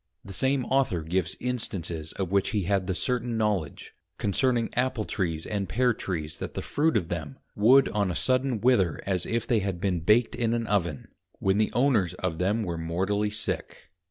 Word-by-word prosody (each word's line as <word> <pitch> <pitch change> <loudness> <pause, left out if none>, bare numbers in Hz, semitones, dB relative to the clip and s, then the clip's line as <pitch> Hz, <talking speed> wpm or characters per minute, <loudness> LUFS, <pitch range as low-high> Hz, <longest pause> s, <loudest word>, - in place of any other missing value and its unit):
The 100 - -7
same 130 +4 +1
Author 125 -11 +1
gives 85 +1 -1
Instances 90 -10 -3
of 95 -2 -3
which 100 -1 +2
he 105 -3 0
had 95 0 0
the 95 - -1
certain 120 +1 -1
knowledge, 100 -9 -2 0.2
concerning 120 +3 +1
Apple 125 -3 0
trees 85 -5 -2
and 100 -2 -3
Pear 125 +1 +2
trees, 80 -7 -4
that - - -6
the - - -3
Fruit 155 -3 +1
of 90 -5 -2
them 75 -6 -5 0.2
would 125 +6 +6
on 100 -2 0
a 90 - -2
sudden 130 -1 +1
wither 105 -9 +3
as 95 -3 -1
if 115 -1 -1
they 115 - +2
had 95 -3 -3
been 95 -2 0
baked 105 +8 +3
in 115 -1 0
an 115 -1 -1
Oven, 85 -9 -1 0.3
when 95 +1 +1
the 110 - +2
owners 120 - +2
of 80 0 -3
them 105 +5 +1
were 85 -4 -3
mortally 95 +6 0
sick. 105 +1 -2
100 Hz, 190 wpm, -27 LUFS, 90-120 Hz, 0.3 s, would